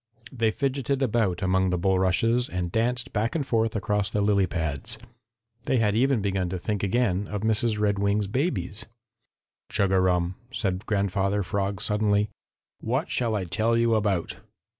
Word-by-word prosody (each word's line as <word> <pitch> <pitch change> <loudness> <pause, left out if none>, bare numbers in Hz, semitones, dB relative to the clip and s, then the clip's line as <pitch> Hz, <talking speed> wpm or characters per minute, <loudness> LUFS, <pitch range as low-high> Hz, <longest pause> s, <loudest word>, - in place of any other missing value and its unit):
They 115 -4 +1
fidgeted 135 +2 -1
about 105 -7 +1
among 95 0 +2
the 90 - 0
bulrushes 95 +6 +2
and 90 -1 -3
danced 120 +3 -1
back 110 +6 0
and 150 -4 0
forth 115 -3 0
across 105 0 0
the 105 - -1
lily 100 -2 +3
pads. 80 - -3 0.7
They 130 - +2
had 105 -3 +2
even 125 -2 +2
begun 95 -3 0
to 95 - -3
think 105 +2 -2
again 100 -2 +1
of 105 -2 -4
Mrs. 110 0 +1
Redwing's 100 0 +1
babies. 115 - -2 0.8
"Chug 100 -1 +1
a 95 - +4
rum!" 90 0 +1
said 100 -4 -2
Grandfather 100 0 0
Frog 100 +1 -2
suddenly. 105 0 +2 0.5
"What - - -2
shall 115 -3 0
I 100 - -1
tell 110 +6 +1
you 115 0 +3
about?" 100 -5 0
105 Hz, 160 wpm, -26 LUFS, 95-115 Hz, 0.8 s, a